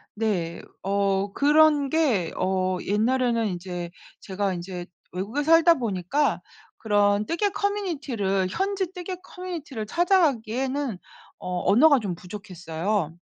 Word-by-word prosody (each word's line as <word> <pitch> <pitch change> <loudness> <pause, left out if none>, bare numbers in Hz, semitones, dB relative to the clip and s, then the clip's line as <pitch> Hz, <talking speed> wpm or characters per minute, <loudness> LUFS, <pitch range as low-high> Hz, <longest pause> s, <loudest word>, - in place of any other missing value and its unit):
네. 185 -6 -1 0.2
어 195 0 0
그런 295 -1 +4
게 255 - +1
어 185 0 0
옛날에는 230 +2 +1
인제 175 -2 -5 0.3
제가 195 0 -2
인제 175 0 -6 0.3
외국에 205 +11 -2
살다 330 +2 +6
보니까 230 - 0 0.4
그런 205 -1 +2
뜨개 400 - 0
커뮤니티를 290 - -1
현지 385 - -1
뜨개 365 0 -5
커뮤니티를 320 -13 -6
찾아 350 - +3
가기에는 265 - -1 0.4
어 180 -1 -3
언어가 280 +5 +6
좀 195 -5 -3
부족했어요. 180 -2 -4
215 Hz, 260 characters per minute, -25 LUFS, 190-300 Hz, 0.4 s, 살다